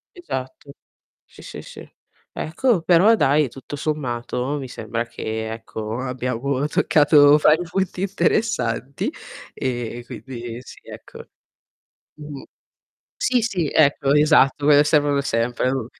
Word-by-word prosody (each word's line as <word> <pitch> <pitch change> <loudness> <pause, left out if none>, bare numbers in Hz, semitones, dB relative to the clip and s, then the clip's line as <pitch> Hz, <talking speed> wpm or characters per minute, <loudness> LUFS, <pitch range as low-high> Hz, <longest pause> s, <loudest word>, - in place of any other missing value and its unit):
Esatto, 140 - -7 0.5
sì, - - -17
sì, - - -9
sì. - - -12 0.4
Ecco 185 +4 0
però 180 +6 +5
dai, 145 - +2
tutto 135 +3 -9
sommato 130 -2 -3
mi 135 - -6
sembra 115 0 -4
che, 110 -1 -5
ecco, 110 0 -6
abbiamo 125 -2 -3
boh, 140 +1 -1
toccato 145 -1 +5
vari 155 +3 +3
punti 185 -1 -2
interessanti 190 - -1 0.4
e 120 -2 -4
quindi 120 -3 -8
sì, - - -14
ecco. - - -12 0.9
Mh-mh. 150 -2 -9 0.8
Sì, 250 -1 +2
sì, 180 -9 -1
ecco 140 -2 +3
esatto, 150 -1 +4
quelle 145 -1 +6
servono 145 -2 +2
sempre 120 +1 -1
u 130 -4 -2
140 Hz, 120 wpm, -21 LUFS, 120-155 Hz, 0.9 s, quelle